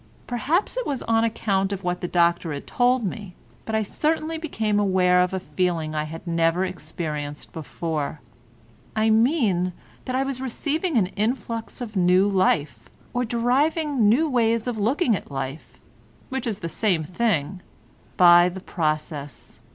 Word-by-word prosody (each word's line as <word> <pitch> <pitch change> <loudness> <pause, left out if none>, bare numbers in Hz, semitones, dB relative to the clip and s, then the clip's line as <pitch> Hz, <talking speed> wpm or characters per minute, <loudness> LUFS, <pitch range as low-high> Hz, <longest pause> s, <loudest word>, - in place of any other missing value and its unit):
Perhaps 290 - 0
it - - -2
was 275 -3 -2
on 225 0 +2
account 195 -4 0
of 200 -1 -4
what 180 0 -2
the 175 - -2
doctor 170 -1 +2
had 140 - -6
told 245 0 +2
me, 200 -2 -5 0.3
but 220 - -2
I 220 - +2
certainly 315 +7 -1
became 220 -10 -1
aware 185 -2 +3
of 180 +1 +1
a 190 - -2
feeling 175 -4 -1
I 155 0 -1
had 165 +3 -8
never 165 +1 +1
experienced 155 -4 -5
before. 155 0 -4 0.8
I 220 0 +3
mean 220 - +2 0.3
that 255 - -2
I 265 - +2
was 270 -1 -4
receiving 295 +5 -1
an 205 - +4
influx 230 +2 -2
of 220 -3 -6
new 185 +1 +4
life, 155 - +1 0.2
or 245 - 0
deriving 255 +2 +2
new 290 +9 +3
ways 230 -4 +1
of 240 -3 -3
looking 240 - +2
at - - -7
life—which 140 - -7
is 210 -3 -3
the 170 - -3
same 170 0 +1
thing—by 175 -1 +2
the 185 +1 -7
process. 155 -4 -4
200 Hz, 150 wpm, -24 LUFS, 170-245 Hz, 0.8 s, an